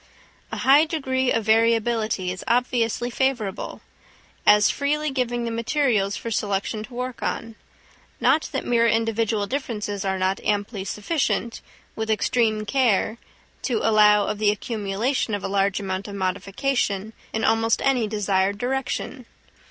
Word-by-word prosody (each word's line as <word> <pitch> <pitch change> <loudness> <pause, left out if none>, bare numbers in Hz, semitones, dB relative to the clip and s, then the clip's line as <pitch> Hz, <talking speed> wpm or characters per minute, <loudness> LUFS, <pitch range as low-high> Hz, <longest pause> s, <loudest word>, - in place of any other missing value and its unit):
A - - -4
high 285 +4 +5
degree 265 -5 -1
of 225 - +1
variability 225 -3 +2
is 185 - -6
obviously 240 0 +1
favourable, 240 -7 -2 0.7
as 210 0 +6
freely 300 +1 -1
giving 245 -2 -1
the 230 - -2
materials 230 -4 0
for 230 - -5
selection 205 0 -1
to 240 - -12
work 250 0 -4
on; 230 0 -3 0.7
not 315 - +2
that 270 - -3
mere 235 -1 +3
individual 225 -2 +1
differences 210 -5 -3
are 190 -1 -1
not 190 +1 -1
amply 205 -1 -1
sufficient, 235 +1 -1 0.3
with 220 0 -3
extreme 220 0 +1
care, 230 -3 +1 0.4
to 235 -4 0
allow 210 -1 +5
of 210 - -3
the 215 -1 +3
accumulation 215 +3 -1
of 200 - -6
a - - -1
large 195 0 +1
amount 190 0 -4
of 200 - -7
modification 200 +3 -1 0.2
in 220 - -2
almost 225 0 +2
any 255 -5 +2
desired 200 -2 0
direction. 255 +1 -3
225 Hz, 140 wpm, -23 LUFS, 205-245 Hz, 0.7 s, as